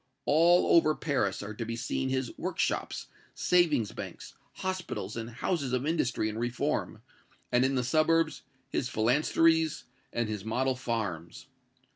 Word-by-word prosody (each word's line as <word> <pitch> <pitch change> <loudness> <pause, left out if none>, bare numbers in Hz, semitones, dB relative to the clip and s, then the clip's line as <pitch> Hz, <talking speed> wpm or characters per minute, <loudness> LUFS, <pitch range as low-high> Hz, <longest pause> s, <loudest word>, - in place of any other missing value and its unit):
All 170 +5 +5
over 155 -2 +5
Paris 130 -11 -1
are 105 +1 -6
to 115 - -4
be 115 +1 -4
seen 125 +2 -2
his 130 -2 -2
workshops, - - -2 0.3
savings 160 - +2
banks, - - -8 0.2
hospitals 185 -2 -4
and 115 0 -4
houses 135 +2 -2
of 130 +1 0
industry 130 -8 0
and 110 +1 -4
reform, 120 0 -2 0.5
and, 125 +1 +4
in 135 +1 +2
the 125 - +1
suburbs, 155 +4 +2 0.3
his 130 - -2
phalansteries 155 +7 +2 0.3
and 120 -1 -1
his 105 -3 -4
model 130 +4 0
farms. 105 -10 -4
130 Hz, 140 wpm, -29 LUFS, 115-155 Hz, 0.5 s, All